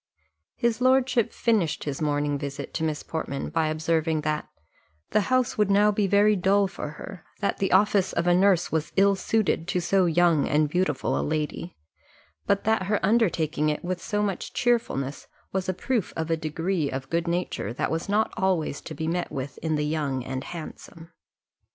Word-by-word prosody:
His 235 Hz, 0 st, 0 dB
lordship 255 Hz, -2 st, +3 dB
finished 210 Hz, -9 st, 0 dB
his 145 Hz, -1 st, -4 dB
morning 145 Hz, -1 st, 0 dB
visit 140 Hz, 0 st, -6 dB
to -, -, -2 dB
Miss 155 Hz, -2 st, -2 dB
Portman, 150 Hz, -4 st, -4 dB
by 160 Hz, -1 st, +1 dB
observing 160 Hz, 0 st, 0 dB
that 150 Hz, 0 st, -2 dB, 0.6 s
"the 215 Hz, -, +3 dB
house 255 Hz, -3 st, +1 dB
would 210 Hz, -2 st, +3 dB
now 205 Hz, +1 st, +5 dB
be 205 Hz, -1 st, +1 dB
very 205 Hz, +2 st, +4 dB
dull 195 Hz, +2 st, +3 dB
for 175 Hz, -5 st, -6 dB
her: 175 Hz, +3 st, -9 dB, 0.2 s
that 200 Hz, -, -1 dB
the 195 Hz, -, 0 dB
office 195 Hz, 0 st, +3 dB
of 170 Hz, -, -1 dB
a 175 Hz, -, +4 dB
nurse 185 Hz, -1 st, +3 dB
was 160 Hz, -1 st, -1 dB
ill 200 Hz, 0 st, +4 dB
suited 190 Hz, -4 st, 0 dB
to 180 Hz, -, 0 dB
so 185 Hz, +1 st, +2 dB
young 170 Hz, -3 st, +3 dB
and 150 Hz, +1 st, +3 dB
beautiful 150 Hz, -5 st, 0 dB
a -, -, 0 dB
lady, 155 Hz, +3 st, -3 dB, 0.7 s
but 200 Hz, -, +2 dB
that 220 Hz, -4 st, +1 dB
her 210 Hz, 0 st, +1 dB
undertaking 165 Hz, -9 st, +2 dB
it 150 Hz, +3 st, -3 dB
with 180 Hz, 0 st, -3 dB
so 210 Hz, 0 st, -1 dB
much 195 Hz, -3 st, -3 dB
cheerfulness 185 Hz, -, -1 dB, 0.2 s
was 190 Hz, -1 st, -2 dB
a -, -, +4 dB
proof 220 Hz, +3 st, -2 dB
of 160 Hz, 0 st, -2 dB
a -, -, +4 dB
degree 160 Hz, 0 st, -2 dB
of 135 Hz, 0 st, -6 dB
good 170 Hz, +1 st, 0 dB
nature 170 Hz, -, -2 dB
that 120 Hz, -, -2 dB
was 165 Hz, +4 st, -3 dB
not 215 Hz, +2 st, +1 dB
always 180 Hz, -6 st, 0 dB
to 155 Hz, -, -8 dB
be 160 Hz, -, -4 dB
met 175 Hz, +2 st, -2 dB
with 135 Hz, -2 st, -5 dB
in 160 Hz, -1 st, -1 dB
the 150 Hz, 0 st, 0 dB
young 145 Hz, -4 st, -1 dB
and 130 Hz, +1 st, -5 dB
handsome." 165 Hz, 0 st, -9 dB
170 Hz, 190 wpm, -26 LUFS, 155-200 Hz, 0.7 s, now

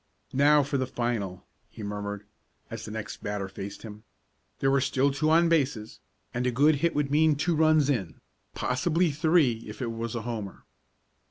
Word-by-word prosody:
"Now 145 Hz, +2 st, +5 dB
for 140 Hz, 0 st, -2 dB
the 130 Hz, -, -1 dB
final!" 115 Hz, -8 st, -3 dB, 0.2 s
he 110 Hz, -, -10 dB
murmured, 105 Hz, 0 st, -5 dB, 0.5 s
as -, -, -6 dB
the -, -, -7 dB
next 110 Hz, +1 st, -6 dB
batter 105 Hz, -1 st, -3 dB
faced 95 Hz, +1 st, -8 dB
him. 105 Hz, -1 st, -10 dB, 0.5 s
There 135 Hz, -, +1 dB
were 140 Hz, -1 st, +3 dB
still 135 Hz, +1 st, +2 dB
two 155 Hz, +3 st, 0 dB
on 165 Hz, +2 st, +5 dB
bases, 135 Hz, -9 st, 0 dB, 0.3 s
and 125 Hz, +1 st, -1 dB
a -, -, +2 dB
good 145 Hz, +5 st, +4 dB
hit 170 Hz, +3 st, 0 dB
would 145 Hz, -1 st, 0 dB
mean 155 Hz, +1 st, +4 dB
two 165 Hz, +4 st, 0 dB
runs 155 Hz, -2 st, +4 dB
in, 105 Hz, -, -2 dB, 0.4 s
possibly 165 Hz, +6 st, +1 dB
three 150 Hz, -6 st, +2 dB
if 105 Hz, -, -9 dB
it 120 Hz, -3 st, -2 dB
was 115 Hz, 0 st, -4 dB
a 115 Hz, -, -3 dB
homer. 110 Hz, -5 st, -6 dB
130 Hz, 180 wpm, -27 LUFS, 110-150 Hz, 0.5 s, Now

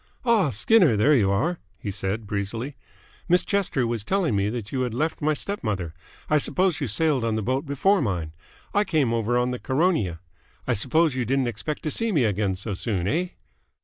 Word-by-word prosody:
"Ah, 220 Hz, -, +3 dB
Skinner, 140 Hz, -, +4 dB
there 140 Hz, +9 st, +4 dB
you 105 Hz, -8 st, +3 dB
are!" 160 Hz, -, 0 dB, 0.2 s
he 100 Hz, -, -5 dB
said 95 Hz, +3 st, -3 dB
breezily. 105 Hz, +7 st, -3 dB, 0.5 s
"Miss 180 Hz, +1 st, +4 dB
Chester 190 Hz, -11 st, 0 dB
was 115 Hz, -3 st, -2 dB
telling 185 Hz, -, 0 dB
me 100 Hz, +1 st, +1 dB
that 110 Hz, -2 st, -5 dB
you 130 Hz, -, -1 dB
had 125 Hz, -3 st, -2 dB
left 155 Hz, +6 st, -1 dB
my 155 Hz, +1 st, +2 dB
step 200 Hz, +7 st, -4 dB
mother. 95 Hz, -7 st, -2 dB, 0.3 s
I 155 Hz, -, +3 dB
suppose 180 Hz, +1 st, +1 dB
you 140 Hz, -, 0 dB
sailed 140 Hz, +3 st, +1 dB
on 115 Hz, -1 st, 0 dB
the 110 Hz, -, -2 dB
boat 130 Hz, +6 st, -1 dB
before 170 Hz, +8 st, +2 dB
mine. 85 Hz, -, -2 dB, 0.4 s
I 205 Hz, -, +3 dB
came 150 Hz, -, +1 dB
over 115 Hz, +1 st, +1 dB
on 125 Hz, +1 st, +1 dB
the 125 Hz, -, -4 dB
Caronia. 130 Hz, -, 0 dB, 0.5 s
I -, -, +1 dB
suppose 155 Hz, +8 st, +2 dB
you 130 Hz, -1 st, -1 dB
didn't 135 Hz, +3 st, +1 dB
expect 130 Hz, +7 st, -5 dB
to 155 Hz, -, -2 dB
see 230 Hz, +6 st, 0 dB
me 150 Hz, -9 st, +2 dB
again 100 Hz, -3 st, 0 dB
so 100 Hz, +3 st, -4 dB
soon, 95 Hz, -2 st, -2 dB
eh?" 175 Hz, -, 0 dB
125 Hz, 205 wpm, -25 LUFS, 105-160 Hz, 0.5 s, Skinner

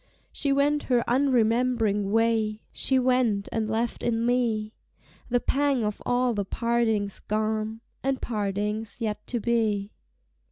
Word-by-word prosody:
She 280 Hz, -, -1 dB
went 290 Hz, +2 st, +2 dB
her 245 Hz, -2 st, +3 dB
unremembering 235 Hz, -5 st, +2 dB
way, 220 Hz, -1 st, +1 dB
She 265 Hz, -, +2 dB
went 250 Hz, -6 st, +2 dB
and 220 Hz, -1 st, -1 dB
left 225 Hz, +2 st, -1 dB
in 230 Hz, -1 st, 0 dB
me 230 Hz, -3 st, 0 dB, 0.6 s
The 245 Hz, 0 st, +2 dB
pang 275 Hz, -1 st, +1 dB
of 210 Hz, -1 st, -3 dB
all 245 Hz, 0 st, +2 dB
the 205 Hz, -2 st, -1 dB
partings 225 Hz, -2 st, 0 dB
gone, 215 Hz, +1 st, -2 dB, 0.2 s
And 270 Hz, 0 st, 0 dB
partings 210 Hz, 0 st, -2 dB
yet 215 Hz, -3 st, -3 dB
to 240 Hz, -, -2 dB
be. 220 Hz, -3 st, 0 dB
225 Hz, 130 wpm, -26 LUFS, 215-250 Hz, 0.6 s, her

